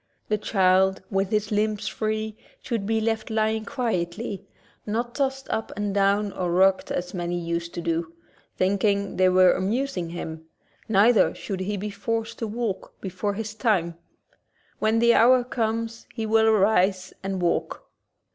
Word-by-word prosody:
The 215 - +2
child, 190 -2 +2
with 195 -1 0
his 210 0 0
limbs 215 0 0
free, 215 0 -2 0.3
should 225 -5 -2
be 225 0 +1
left 220 0 -1
lying 220 0 0
quietly, 200 -3 -3 0.4
not 235 +3 -2
tossed 270 -1 -1
up 220 - -2
and 205 -1 -1
down 200 +1 +2
or 180 -2 -2
rocked 190 +2 +3
as 180 0 -3
many 175 -1 -2
used 170 0 -3
to 170 - -3
do, 165 -1 -2 0.5
thinking 200 +1 +1
they 185 0 +5
were 185 0 +6
amusing 205 -2 -1
him; 160 -2 -6 0.4
neither 220 +2 +4
should 195 -2 -5
he 200 +2 -2
be 205 +2 -4
forced 225 +2 -3
to 225 - -2
walk 215 -3 -4
be 190 - -5
fore 200 +2 -2
his 220 0 -4
time. 205 -7 +1 0.9
When 220 +1 +2
the 235 +1 +5
hour 250 +2 +5
comes 230 -1 -3
he 225 -2 -2
will 220 0 +3
arise 195 -3 +2
and 195 -1 -3
walk. 175 -1 -1
205 Hz, 155 wpm, -25 LUFS, 185-220 Hz, 0.9 s, were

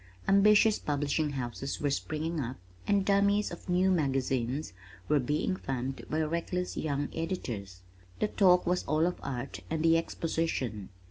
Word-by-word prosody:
Ambitious 210 +2 +5
publishing 145 +1 -1
houses 135 +1 -4
were 145 -1 0
springing 155 +3 -2
up 130 -1 -3 0.3
and 200 -1 +2
"dummies" 200 +1 +3
of 175 - -9
new 185 +2 +3
magazines 135 - 0 0.3
were 150 -1 +3
being 150 +8 0
thumbed 135 -4 -4
by 155 - 0
reckless 170 +3 -2
young 145 -2 -1
editors. 115 - -4 0.4
The - - +2
talk 180 -3 +4
was 180 +1 +1
all 155 +1 +2
of 180 - -1
Art, 135 -1 -5
and 160 0 -1
the 165 0 +5
Exposition. 160 - -2
155 Hz, 145 wpm, -30 LUFS, 135-180 Hz, 0.4 s, Ambitious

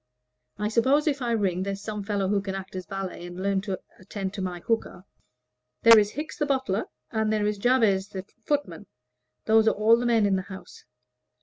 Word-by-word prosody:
I 210 0 -1
suppose 265 +7 +3
if 285 -3 0
I 240 -1 -1
ring 190 -5 0
there's 200 +1 -4
some 210 -1 -4
fellow 200 -1 -1
who 200 +1 +1
can 195 -1 -4
act 190 0 -7
as 185 -1 -6
valet 195 -3 -5
and 175 +1 -9
learn 195 0 0
to 195 -2 -4 0.2
attend 190 +1 -5
to 205 - -5
my 180 -2 -3
hookah?" 225 -4 -2 0.8
"There 230 -1 +9
is 205 0 0
Hickes 305 +4 -6
the 295 - +1
butler, 260 -8 0 0.3
and 220 -1 0
there 215 -1 +1
is 210 -1 -1
Jabez 215 -5 +3
the 190 -2 -7 0.2
footman; 280 - -2 0.6
those 220 0 +4
are - - +4
all 220 +2 +5
the 240 +1 -1
men 230 -3 +3
in 195 -1 +2
the - - -1
house. 190 -1 -11
205 Hz, 205 wpm, -26 LUFS, 190-230 Hz, 0.8 s, There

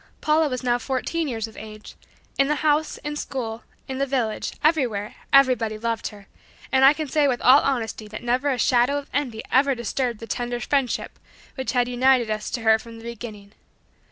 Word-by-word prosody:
Paula 310 0 +2
was 255 -1 -4
now 245 -1 +1
fourteen 280 +6 -2
years 225 -4 -3
of 220 - -15
age. 215 0 -10 0.5
In 275 - +4
the 300 - +1
house, 305 +1 +2
at 295 0 -3
school, 230 -4 -4 0.3
in 265 0 -4
the 275 - 0
village, 245 -5 -1
everywhere, 250 -10 +1 0.2
everybody 250 -6 +4
loved 230 0 -2
her, 205 -2 -11 0.5
and 265 0 +4
I 270 - +9
can 305 0 -3
say 290 +1 +2
with 250 -3 0
all 265 +3 +7
honesty 225 -5 -2
that 215 +2 -8
never 250 +4 +1
a 260 - 0
shadow 245 +3 +3
of 285 - -7
envy 250 -6 -2
ever 275 +1 +4
disturbed 235 0 -2
the 230 - -7
tender 240 +1 -3
friendship 270 -1 -1 0.3
which 265 -1 -3
had 245 -1 +2
united 250 -2 +3
us 215 0 -3
to 240 - -3
her 220 0 +4
from 230 0 -11
the 225 - -12
beginning. 220 -3 -8
245 Hz, 195 wpm, -24 LUFS, 225-275 Hz, 0.5 s, I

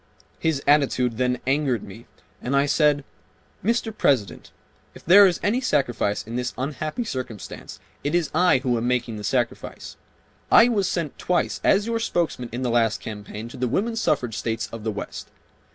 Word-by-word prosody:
His 155 -4 0
attitude 130 -5 +2
then 125 0 +1
angered 135 -4 +1
me 110 +5 -12 0.3
and 130 +3 -1
I 140 +1 +4
said, 145 0 +2 0.6
"Mr. 225 +1 0
President, 125 - 0 0.4
if - - -14
there 195 +4 +8
is 175 - -1
any 230 +6 +1
sacrifice 125 - 0
in 115 +2 -5
this 125 0 -3
unhappy 155 - -3
circumstance, 130 - -7 0.2
it 145 +4 0
is 170 -4 0
I 165 -5 +4
who 125 -3 +1
am 115 +1 -1
making 120 -3 -1
the 105 - -7
sacrifice. 120 +2 -3 0.5
I 235 - +7
was 200 -6 +1
sent 165 -6 -3
twice 180 -1 0
as 205 +1 +3
your 230 0 -1
spokesman 170 - -1
in 120 +3 -4
the 125 - 0
last 115 -2 +2
campaign 105 +1 -7
to - - -10
the 125 - 0
Woman 220 - -1
Suffrage 130 - 0
States 115 -1 -2
of 115 -2 -7
the 110 - -1
West. 100 - -7
135 Hz, 175 wpm, -24 LUFS, 120-175 Hz, 0.6 s, there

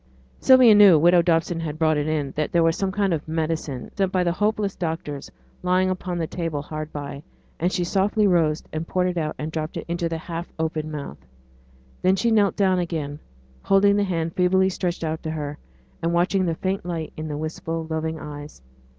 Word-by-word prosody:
Sylvia 255 -4 +7
knew 205 -5 +8
widow 175 +3 +5
Dobson 165 0 +1
had 155 -2 -4
brought 155 -1 +2
it 150 0 -1
in 150 -3 -1
that 150 0 -1
there 170 -1 +3
was 165 0 +3
some 195 -1 -1
kind 195 -2 +1
of 155 -1 -3
medicine, 155 -5 -3
sent 195 -2 0
by 185 -1 +2
the 175 - +1
hopeless 210 +1 0
doctors, 160 -4 -4 0.3
lying 185 +1 +2
upon 180 -1 -3
the 165 - -1
table 160 -3 -3
hard 155 +1 -6
by, 140 -1 -6 0.4
and 175 +3 +1
she 180 - 0
softly 200 +3 +1
rose 165 -5 +2
and 160 +1 -3
poured 185 0 +1
it 180 - -4
out 155 -1 -2
and 155 +1 -4
dropped 155 0 -4
it - - -5
into 170 0 -1
the 165 - -2
half 165 +1 -6
open 160 -1 -2
mouth. 145 - -6 0.8
Then 185 +1 +4
she 230 +4 +1
knelt 205 -3 +3
down 190 -3 +2
again, 155 -4 -3 0.4
holding 200 +1 +4
the 205 - +2
hand 165 -4 -2
feebly 190 +1 +3
stretched 180 -2 -3
out 160 0 -2
to 160 - -4
her, 150 -2 -4 0.4
and 170 +1 0
watching 185 +2 +2
the 165 - 0
faint 190 +3 -2
light 165 -3 -4
in 155 0 -5
the 150 -1 -4
wistful 160 +1 -4
loving 160 0 -2
eyes. 145 - -9
165 Hz, 205 wpm, -23 LUFS, 155-185 Hz, 0.8 s, knew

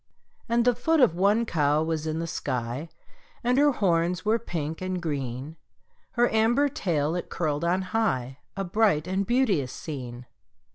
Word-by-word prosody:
And 235 0 +2
the 245 - +5
foot 315 +8 +1
of 245 - +5
one 200 +6 +2
cow 150 -5 +2
was 160 -1 -2
in 155 0 -2
the 165 - -2
sky, 125 0 -3 0.5
And 250 +2 +2
her 290 0 +5
horns 180 -4 +1
were 220 +2 +3
pink 160 -7 -4
and 185 0 -2
green; 140 -2 -4 0.6
Her 240 0 +3
amber 240 +6 +3
tail 165 - -1
it 175 - -4
curled 150 -2 -1
on 180 +3 +1
high 180 - -1 0.2
A 195 - -1
bright 180 -4 +2
and 190 +2 -1
beauteous 205 - +2
scene. 125 -5 -7
175 Hz, 160 wpm, -26 LUFS, 150-225 Hz, 0.6 s, the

